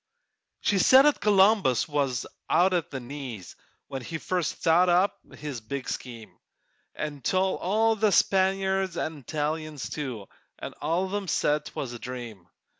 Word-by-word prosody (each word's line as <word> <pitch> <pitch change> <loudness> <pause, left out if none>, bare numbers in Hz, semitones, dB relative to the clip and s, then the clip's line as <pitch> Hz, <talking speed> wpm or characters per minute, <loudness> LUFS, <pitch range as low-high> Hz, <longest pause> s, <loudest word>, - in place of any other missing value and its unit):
She 200 - +2
said 260 +8 +7
'at 295 - +3
Columbus 195 - +4
was 140 -5 -1 0.2
out 185 +2 +4
at 175 -3 0
the 135 - -5
knees 125 -6 -8 0.3
When 135 -1 -5
he 160 +6 -5
first 180 0 -2
thought 175 +3 +3
up 180 +3 +2 0.2
his 145 -5 -6
big 130 +4 -5
scheme, 115 -3 -7 0.6
An' 145 -2 -5
told 185 +7 +1
all 220 +4 +2
the 215 -1 +2
Spaniards 190 0 +2
'nd 155 -1 -3
Italians, 155 +1 -4
too, 125 -9 -5 0.3
An' - - -7
all 165 +5 0
of 190 - -7
'em 205 -2 -2
said 150 -1 +1
'twas 125 -3 -5
a 120 - -8
dream. 120 -8 -8
155 Hz, 155 wpm, -27 LUFS, 130-190 Hz, 0.6 s, said